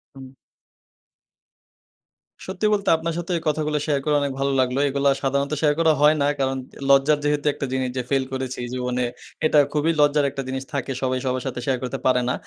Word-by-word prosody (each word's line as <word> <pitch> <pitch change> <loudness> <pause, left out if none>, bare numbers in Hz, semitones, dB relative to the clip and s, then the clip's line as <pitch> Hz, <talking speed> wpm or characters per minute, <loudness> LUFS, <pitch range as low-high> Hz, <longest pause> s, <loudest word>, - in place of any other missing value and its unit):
হুম। 135 -1 -10 2.2
সত্যি 190 +3 -3
বলতে 200 -1 0
আপনার 165 +1 -3
সাথে 175 +1 -4
এই - - -5
কথাগুলা 150 0 0
শেয়ার 145 -3 +1
করা 150 -1 +2
অনেক 140 -1 -1
ভালো 140 0 +1
লাগলো। 130 +1 +1
এগুলা 140 +1 +1
সাধারণত 140 +2 0
শেয়ার 150 -2 +3
করা 160 -1 +4
হয় 150 +1 +6
না। 140 - +3
কারণ 135 0 0 0.3
লজ্জার 140 +2 +4
যেহেতু 145 0 0
একটা 140 - -4
জিনিস 130 -1 -1
যে, 125 - +1
ফাইল 135 -1 +2
করেছি 130 -1 -4
জীবনে 125 0 -1 0.4
এটা 150 -1 +5
খুবই 150 +2 +2
লজ্জার 145 0 +3
একটা 135 - -5
জিনিস 130 0 -3
থাকে। 135 -1 -2
সবাই 130 -1 0
সবার 130 0 -1
সাথে 125 -2 -4
শেয়ার 130 -2 0
করতে 130 +1 -4
পারে 130 -1 +3
না। - - +1
140 Hz, 190 wpm, -23 LUFS, 130-150 Hz, 2.2 s, হয়